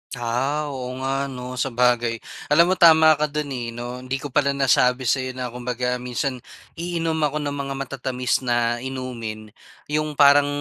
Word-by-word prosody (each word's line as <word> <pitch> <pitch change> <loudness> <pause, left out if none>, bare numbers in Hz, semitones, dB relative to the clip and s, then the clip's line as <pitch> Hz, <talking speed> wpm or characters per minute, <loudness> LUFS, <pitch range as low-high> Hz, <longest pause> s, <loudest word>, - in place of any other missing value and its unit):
Ah, 135 +5 -1
oo 130 -2 -5
nga 135 +1 -1
'no, 125 -1 -7
sabagay. 120 -2 +1 0.2
Alam 170 +4 +5
mo - - +3
tama 160 -2 +7
ka 150 - +2
do'n, 150 -1 -4
eh, 120 -3 -4
'no. 120 +1 -6
Hindi 130 +1 -4
ko 145 - -6
pala 140 0 +2
nasabi 130 -1 +3
sa'yo 130 +1 0
na 125 -1 -4
kumbaga 125 0 -2
minsan, 125 +1 -3 0.4
iinom 165 -2 -2
ako 150 +1 -3
ng 145 - -2
mga 140 -1 -4
matatamis 130 -2 -2
na 120 -2 0
inumin 120 -5 -6 0.4
'yong 155 0 -1
parang 145 0 +7
130 Hz, 165 wpm, -23 LUFS, 125-145 Hz, 0.4 s, tama